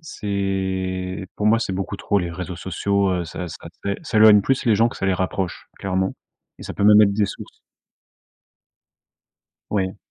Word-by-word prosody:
c'est, 95 - -3
pour 105 - -1
moi, 110 +2 +5
c'est 95 - -2
beaucoup 95 +2 -3
trop 100 +1 0
les 90 -2 -3
réseaux 90 +1 -6
sociaux, 100 +2 0
heu, 90 -1 -1
ça 90 +3 -6
ça 80 - -9 0.2
fait, 100 0 -1
ça 130 -8 -3
éloigne 105 -1 +8
plus 130 +6 0
les 115 -4 +4
gens 115 +3 +4
que - - -10
ça 95 - -2
les 95 - +3
rapproche 95 0 -3
clairement 95 0 -1 0.5
et - - -10
ça - - -6
peut - - -3
même 105 0 +8
être 100 -1 +4
des 105 0 +1
sources 100 - -9 2.1
Oui. 95 -3 -1
95 Hz, 185 wpm, -22 LUFS, 95-105 Hz, 2.1 s, éloigne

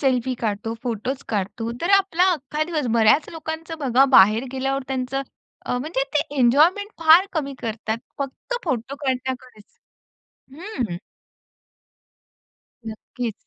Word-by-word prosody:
Selfie 260 -2 +1
काढतो, 220 0 -2
photos 245 +3 -3
काढतो, 215 +2 -2
तर 345 +3 -1
आपला 365 -2 +1
अख्खा 300 -1 -3
दिवस 310 -5 -2
बऱ्याच 230 +6 +4
लोकांचं 320 0 -6
बघा, 265 -2 +4
बाहेर 220 -2 +6
गेल्यावर 270 +1 -1
त्यांचं 265 +1 -2 0.4
अ, 250 - 0
म्हणजे 270 +1 -2
ते 300 - +4 0.2
एन्जॉयमेंट 310 +12 +4
फार 330 +4 +7
कमी 280 -4 -2
करतात, 220 0 -3 0.2
फक्त 280 - -5
फोटो 255 +2 -2
काढण्याकडेच 255 -3 -3 0.9
हं. 275 - -4 1.9
नक्कीच. 225 +1 -5
265 Hz, 115 wpm, -22 LUFS, 230-310 Hz, 1.9 s, फार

